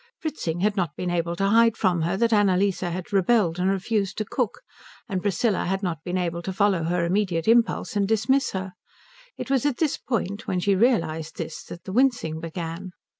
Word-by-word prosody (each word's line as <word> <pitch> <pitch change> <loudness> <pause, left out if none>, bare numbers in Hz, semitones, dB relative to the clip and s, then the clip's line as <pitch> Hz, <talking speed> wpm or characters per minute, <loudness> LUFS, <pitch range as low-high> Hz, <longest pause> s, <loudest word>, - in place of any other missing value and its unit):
Fritzing 175 - -3
had 210 +1 +2
not 175 -7 -1
been 180 -1 -3
able 170 0 -1
to 195 +3 0
hide 230 +1 +4
from 180 -4 +1
her 175 +4 0
that 230 +2 +2
Annalise 200 -2 +3
had 180 +2 -4
rebelled 195 -3 +2
and 185 +1 +2
refused 195 0 -1
to 215 - -1
cook, 245 -1 -2 0.5
and 190 -3 -2
Priscilla 205 +1 0
had 195 +2 -1
not 165 -4 -3
been 180 0 -2
able 170 -1 -2
to 190 - -4
follow 190 -3 +1
her 170 0 0
immediate 180 -2 0
impulse 230 -1 +2
and 200 -1 +1
dismiss 225 +6 +1
her. 190 -1 -4 0.6
It - - -5
was 270 -3 +2
at 290 -4 0
this 315 -4 0
point, 210 -3 -3
when 180 - 0
she 200 +3 +2
realized 165 -8 +1
this, 160 -1 -5
that 175 - -10
the 190 - -7
wincing 230 -11 +1
began. 165 +2 -6
190 Hz, 200 wpm, -25 LUFS, 175-215 Hz, 0.6 s, hide